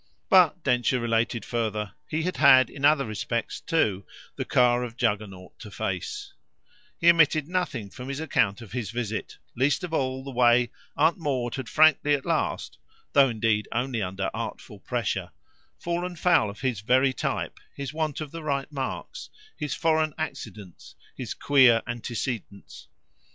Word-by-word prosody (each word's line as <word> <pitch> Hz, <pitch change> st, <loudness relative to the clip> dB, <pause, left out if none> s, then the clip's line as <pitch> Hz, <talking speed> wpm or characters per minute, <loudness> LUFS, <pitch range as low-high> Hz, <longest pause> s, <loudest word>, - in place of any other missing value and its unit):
But, 180 Hz, -4 st, +5 dB
Densher 125 Hz, +1 st, +2 dB
related 115 Hz, -1 st, 0 dB
further, 110 Hz, -3 st, -2 dB, 0.2 s
he 160 Hz, +1 st, -1 dB
had 180 Hz, +2 st, -2 dB
had 130 Hz, -1 st, +6 dB
in 140 Hz, -, -9 dB
other 145 Hz, -1 st, +4 dB
respects 115 Hz, +2 st, -3 dB
too 105 Hz, -, 0 dB, 0.3 s
the -, -, -3 dB
car 125 Hz, 0 st, +3 dB
of 120 Hz, -1 st, -7 dB
Juggernaut 105 Hz, -6 st, -3 dB
to 110 Hz, -, -9 dB
face; 390 Hz, -, -4 dB, 0.7 s
he 170 Hz, -, +1 dB
omitted 155 Hz, -3 st, +3 dB
nothing 140 Hz, -, -2 dB
from 130 Hz, 0 st, -8 dB
his 140 Hz, +1 st, -4 dB
account 110 Hz, -10 st, +1 dB
of 110 Hz, -, -13 dB
his 120 Hz, -5 st, -3 dB
visit, 115 Hz, -2 st, -4 dB, 0.2 s
least 140 Hz, +7 st, +1 dB
of 175 Hz, -2 st, -5 dB
all 130 Hz, -3 st, -1 dB
the 135 Hz, -, -7 dB
way 120 Hz, -1 st, +4 dB, 0.3 s
Aunt 160 Hz, +4 st, +3 dB
Maud 130 Hz, -6 st, -2 dB
had 130 Hz, -3 st, -5 dB
frankly 155 Hz, -2 st, +5 dB
at 135 Hz, -, -6 dB
last 165 Hz, -2 st, -2 dB, 0.3 s
though 140 Hz, -2 st, +6 dB
indeed 110 Hz, -2 st, 0 dB
only 120 Hz, -1 st, -1 dB
under 95 Hz, 0 st, -3 dB
artful -, -, -6 dB
pressure -, -, -2 dB, 0.5 s
fallen 175 Hz, +1 st, -3 dB
foul 170 Hz, -, +3 dB
of 100 Hz, -, -10 dB
his 125 Hz, -6 st, -1 dB
very 130 Hz, +4 st, +3 dB
type, -, -, -3 dB, 0.2 s
his 140 Hz, 0 st, -5 dB
want 155 Hz, -2 st, -2 dB
of 150 Hz, -2 st, -6 dB
the 165 Hz, -, -7 dB
right 140 Hz, -1 st, -2 dB
marks, 145 Hz, -, -5 dB, 0.3 s
his 150 Hz, -3 st, -3 dB
foreign 155 Hz, -2 st, +1 dB
accidents, 105 Hz, -, -7 dB, 0.2 s
his -, -, -5 dB
queer 130 Hz, -5 st, +5 dB
antecedents. 120 Hz, -3 st, -5 dB
130 Hz, 155 wpm, -26 LUFS, 115-155 Hz, 0.7 s, had